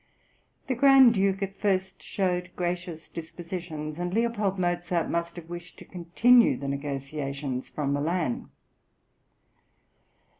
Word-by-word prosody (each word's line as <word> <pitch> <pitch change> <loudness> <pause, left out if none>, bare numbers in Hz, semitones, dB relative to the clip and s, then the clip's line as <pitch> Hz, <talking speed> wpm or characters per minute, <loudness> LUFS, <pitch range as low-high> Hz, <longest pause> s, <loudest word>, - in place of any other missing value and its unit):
The 265 - -1
Grand 265 -1 +7
Duke 195 0 +1
at 195 0 -6
first 190 -2 0
showed 180 -2 -1
gracious 175 -2 -3
dispositions, 165 -2 -6
and 175 +3 -2
L. 235 0 +2 0.2
Mozart 175 -1 -1
must 170 0 -2
have 170 -2 -9
wished 175 0 -9
to - - -12
continue 210 +8 +4
the 140 - -5
negotiations 140 -1 -4
from 140 -2 -2
Milan. 155 -2 -1
175 Hz, 115 wpm, -27 LUFS, 155-190 Hz, 0.2 s, Grand